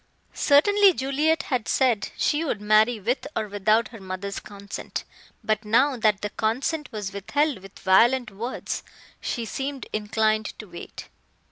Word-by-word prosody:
Certainly 390 Hz, +6 st, +5 dB
Juliet 300 Hz, +4 st, +1 dB
had 250 Hz, -5 st, -2 dB
said 240 Hz, -6 st, +2 dB
she 300 Hz, +2 st, +1 dB
would 275 Hz, -9 st, -2 dB
marry 215 Hz, +2 st, +3 dB
with 245 Hz, +8 st, -1 dB
or 215 Hz, -, -1 dB
without 215 Hz, +2 st, +2 dB
her 225 Hz, -, -11 dB
mother's 190 Hz, +1 st, -5 dB
consent, 200 Hz, -1 st, -7 dB, 0.4 s
but 215 Hz, 0 st, 0 dB
now 255 Hz, +6 st, +3 dB
that 215 Hz, -4 st, +2 dB
the 210 Hz, -, -3 dB
consent 265 Hz, +8 st, -1 dB
was 205 Hz, -3 st, -5 dB
withheld 275 Hz, -, 0 dB
with 195 Hz, +1 st, -14 dB
violent 235 Hz, +5 st, +4 dB
words, 230 Hz, +6 st, -4 dB, 0.4 s
she 235 Hz, -, -3 dB
seemed 270 Hz, +5 st, -4 dB
inclined 215 Hz, 0 st, 0 dB
to 215 Hz, -, -8 dB
wait. 175 Hz, -3 st, -10 dB
220 Hz, 145 wpm, -25 LUFS, 210-270 Hz, 0.4 s, Certainly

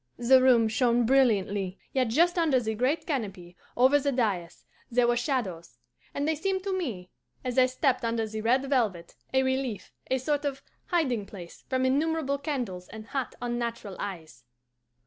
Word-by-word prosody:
The 255 Hz, +2 st, +5 dB
room 245 Hz, -3 st, +5 dB
shone 240 Hz, +1 st, +2 dB
brilliantly, 205 Hz, -7 st, +2 dB, 0.2 s
yet 260 Hz, -2 st, +2 dB
just 340 Hz, +10 st, +3 dB
under 305 Hz, -6 st, +3 dB
the 220 Hz, -2 st, -2 dB
great 255 Hz, +8 st, 0 dB
canopy, 195 Hz, -, -4 dB, 0.2 s
over 260 Hz, +4 st, +5 dB
the 280 Hz, 0 st, 0 dB
dais; 205 Hz, -10 st, -2 dB, 0.2 s
there 245 Hz, 0 st, +3 dB
were 240 Hz, -, +3 dB
shadows, 200 Hz, -, -3 dB, 0.3 s
and 285 Hz, +1 st, -2 dB
they 320 Hz, -, +2 dB
seemed 380 Hz, +4 st, -2 dB
to 390 Hz, -1 st, -1 dB
me, 220 Hz, -, -4 dB, 0.3 s
as 250 Hz, +1 st, +1 dB
I 255 Hz, -, +6 dB
stepped 255 Hz, 0 st, 0 dB
under 230 Hz, -1 st, 0 dB
the 215 Hz, 0 st, -5 dB
red 255 Hz, +5 st, +2 dB
velvet, 215 Hz, -11 st, 0 dB, 0.2 s
a 265 Hz, 0 st, +3 dB
relief, 260 Hz, -4 st, -2 dB, 0.2 s
a 260 Hz, -, +2 dB
sort 290 Hz, +3 st, -1 dB
of 275 Hz, -2 st, -3 dB, 0.2 s
hiding 255 Hz, -, 0 dB
place 175 Hz, -4 st, -11 dB
from 260 Hz, 0 st, +1 dB
innumerable 285 Hz, +1 st, +1 dB
candles 245 Hz, -, -4 dB
and 220 Hz, 0 st, -10 dB
hot 270 Hz, -3 st, -3 dB
unnatural 235 Hz, -4 st, -3 dB
eyes. 160 Hz, -10 st, -7 dB
250 Hz, 165 wpm, -28 LUFS, 215-275 Hz, 0.3 s, I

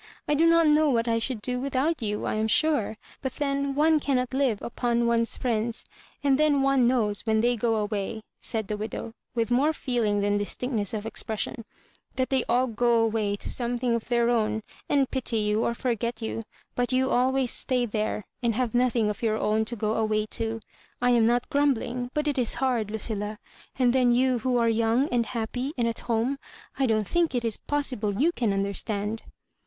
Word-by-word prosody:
I 295 Hz, -, +2 dB
do 320 Hz, +3 st, +4 dB
not 335 Hz, 0 st, +5 dB
know 305 Hz, 0 st, +4 dB
what 235 Hz, -3 st, +1 dB
I 230 Hz, 0 st, +2 dB
should 225 Hz, -2 st, -3 dB
do 250 Hz, -1 st, 0 dB
without 275 Hz, +4 st, 0 dB
you, 210 Hz, -2 st, -2 dB
I -, -, -1 dB
am 215 Hz, +1 st, 0 dB
sure; 235 Hz, -3 st, +2 dB, 0.3 s
but 265 Hz, -, -4 dB
then 280 Hz, -1 st, -1 dB
one 310 Hz, +2 st, +4 dB
cannot 255 Hz, -3 st, 0 dB
live 260 Hz, -6 st, +1 dB
upon 235 Hz, 0 st, 0 dB
one's 230 Hz, 0 st, +1 dB
friends; 230 Hz, -2 st, -2 dB, 0.4 s
and 275 Hz, -1 st, +3 dB
then 295 Hz, -3 st, +3 dB
one 270 Hz, -3 st, +4 dB
knows, 220 Hz, -5 st, +1 dB
when 220 Hz, -1 st, +1 dB
they 240 Hz, +1 st, +2 dB
go 225 Hz, -2 st, 0 dB
awayi^' 215 Hz, +1 st, -4 dB, 0.2 s
said 220 Hz, -3 st, -2 dB
the 210 Hz, -, -3 dB
widow, 220 Hz, +1 st, -5 dB, 0.2 s
with 230 Hz, 0 st, 0 dB
more 280 Hz, +6 st, +3 dB
feeling 230 Hz, -8 st, 0 dB
than 205 Hz, 0 st, +1 dB
distinctness 215 Hz, 0 st, -3 dB
of 210 Hz, 0 st, -4 dB
expression, 225 Hz, 0 st, -3 dB, 0.2 s
" -, -, -36 dB
that 260 Hz, 0 st, -1 dB
they 265 Hz, -2 st, +3 dB
all 250 Hz, +2 st, +3 dB
go 235 Hz, 0 st, +2 dB
away 215 Hz, -2 st, 0 dB
to -, -, -7 dB
something 240 Hz, 0 st, -1 dB
of 230 Hz, -1 st, -2 dB
their 235 Hz, 0 st, +2 dB
own, 220 Hz, -2 st, 0 dB, 0.3 s
and 275 Hz, -2 st, +2 dB
pity 250 Hz, -3 st, 0 dB
you 210 Hz, +1 st, +1 dB
or 235 Hz, -, 0 dB
forget 235 Hz, -1 st, -2 dB
you; 225 Hz, 0 st, -3 dB, 0.3 s
but 245 Hz, 0 st, -1 dB
you 260 Hz, +1 st, +2 dB
always 260 Hz, 0 st, +2 dB
stay 250 Hz, -2 st, +1 dB
there, 215 Hz, -2 st, -2 dB, 0.2 s
and 235 Hz, -2 st, +1 dB
have 245 Hz, -2 st, -1 dB
nothing 245 Hz, -3 st, +2 dB
of 210 Hz, -1 st, -3 dB
your 220 Hz, -2 st, +1 dB
own 215 Hz, +1 st, +1 dB
to 235 Hz, -, -4 dB
go 215 Hz, -1 st, -1 dB
away 215 Hz, -1 st, +1 dB
to. 225 Hz, 0 st, -2 dB, 0.4 s
I 245 Hz, 0 st, +3 dB
am 235 Hz, -2 st, +4 dB
not 240 Hz, +1 st, +1 dB
grumbUng, 250 Hz, -3 st, 0 dB
but 300 Hz, 0 st, 0 dB
it 285 Hz, -2 st, 0 dB
is 240 Hz, -, 0 dB
hard, 245 Hz, -6 st, 0 dB
Lucilla; 215 Hz, -1 st, -4 dB, 0.4 s
and 250 Hz, -2 st, +3 dB
then 250 Hz, -2 st, +4 dB
you 250 Hz, 0 st, +3 dB
who 250 Hz, +2 st, 0 dB
are 235 Hz, -1 st, +3 dB
young, 230 Hz, +4 st, +2 dB
and 235 Hz, -2 st, +1 dB
happy, 245 Hz, +4 st, -3 dB
and 235 Hz, -1 st, +1 dB
at 230 Hz, -, -3 dB
home, 235 Hz, +5 st, +1 dB, 0.4 s
I 270 Hz, -, +3 dB
don^t 215 Hz, -3 st, +1 dB
think 340 Hz, -5 st, +1 dB
it 240 Hz, -1 st, 0 dB
is 225 Hz, -2 st, 0 dB
possible 245 Hz, -8 st, -1 dB
you 320 Hz, +5 st, +4 dB
can 235 Hz, -10 st, 0 dB
understand." 200 Hz, +2 st, -2 dB
235 Hz, 200 wpm, -26 LUFS, 220-260 Hz, 0.4 s, not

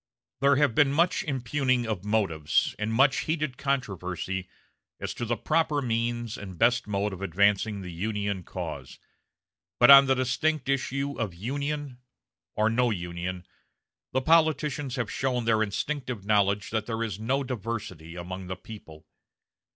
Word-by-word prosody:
There 140 Hz, +1 st, +4 dB
have 145 Hz, -4 st, +3 dB
been 140 Hz, +3 st, +4 dB
much 170 Hz, +5 st, +2 dB
impugning 130 Hz, -2 st, 0 dB
of 105 Hz, -5 st, -3 dB
motives 95 Hz, -8 st, +1 dB
and 105 Hz, +1 st, -1 dB
much 135 Hz, +4 st, +3 dB
heated 155 Hz, -5 st, -1 dB
controversy 95 Hz, -, -3 dB, 0.5 s
as -, -, -4 dB
to 120 Hz, -, -4 dB
the 120 Hz, 0 st, -1 dB
proper 155 Hz, +2 st, +1 dB
means 120 Hz, -2 st, -2 dB
and 95 Hz, -3 st, -8 dB
best 120 Hz, +2 st, +3 dB
mode 100 Hz, 0 st, -1 dB
of 95 Hz, -, -8 dB
advancing 100 Hz, +3 st, +1 dB
the 90 Hz, -2 st, -7 dB
Union 100 Hz, +2 st, -2 dB
cause; -, -, -7 dB, 0.8 s
but 120 Hz, -, +8 dB
on 140 Hz, 0 st, +10 dB
the 135 Hz, -, +4 dB
distinct 130 Hz, +3 st, 0 dB
issue 140 Hz, +1 st, -1 dB
of 105 Hz, -7 st, -2 dB
Union 140 Hz, -, -4 dB, 0.6 s
or 110 Hz, +1 st, +2 dB
no 120 Hz, +2 st, +2 dB
Union 90 Hz, -2 st, -4 dB, 0.7 s
the 130 Hz, -, +1 dB
politicians 150 Hz, -4 st, +2 dB
have 125 Hz, -5 st, -2 dB
shown 125 Hz, -3 st, -1 dB
their 110 Hz, -1 st, +3 dB
instinctive 120 Hz, +1 st, -3 dB
knowledge 100 Hz, -1 st, +2 dB
that 110 Hz, -1 st, -1 dB
there 115 Hz, -1 st, -2 dB
is 105 Hz, -3 st, -4 dB
no 130 Hz, +6 st, 0 dB
diversity 105 Hz, -9 st, -5 dB
among 90 Hz, +1 st, -6 dB
the 95 Hz, -, -4 dB
people. 90 Hz, -6 st, -12 dB
115 Hz, 150 wpm, -27 LUFS, 100-135 Hz, 0.8 s, on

